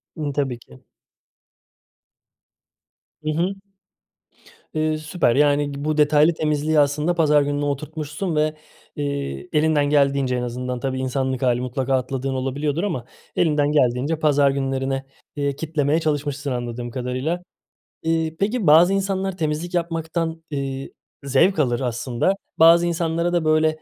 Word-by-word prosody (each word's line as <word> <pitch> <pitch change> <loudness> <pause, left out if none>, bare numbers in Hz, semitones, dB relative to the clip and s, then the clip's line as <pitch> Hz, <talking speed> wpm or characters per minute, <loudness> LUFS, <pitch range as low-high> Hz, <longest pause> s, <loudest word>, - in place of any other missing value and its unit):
Imm, 150 -3 -3
tabii 135 -4 -1
ki. 65 - -17 2.4
Hı 155 - -2
hı. 175 +5 0 1.2
Iıı, 155 0 0
süper, 155 -5 0
yani, 145 0 +3
bu 155 0 0
detaylı 150 +2 +4
temizliği 155 0 +1
aslında 150 +4 +2
pazar 150 -3 +4
gününe 145 0 -1
oturtmuşsun 155 +4 -3
ve, 155 0 +1 0.4
eee, 140 +4 -4
elinden 150 -1 +3
geldiğince 140 -3 +2
en 125 - -1
azından 125 +1 -4
tabii 130 0 -2
insanlık 130 0 -1
hâli 125 -1 +2
mutlaka 130 +1 -2
atladığın 130 +1 -2
olabiliyordur 140 +5 -2
ama 160 -13 -2 0.3
elinden 150 -3 +2
geldiğince 140 +2 +1
pazar 145 -3 +3
günlerine, 135 0 -2 0.3
eee, 140 -1 -1
kitlemeye 155 0 0
çalışmışsın 145 -2 -2
anladığım 120 -1 -4
kadarıyla. 130 +8 -3 0.6
Iıı, 160 -1 0
peki 210 -2 0
bazı 170 +5 +7
insanlar 195 -1 -1
temizlik 160 +3 -2
yapmaktan, 165 -1 -2
ııı, 135 -1 -3 0.4
zevk 160 +7 +3
alır 120 -5 +1
aslında. 125 +6 0 0.3
Bazı 165 +1 +7
insanlara 170 0 0
da 170 -2 +1
böyle, 155 0 +4
145 Hz, 130 wpm, -22 LUFS, 135-160 Hz, 2.4 s, bazı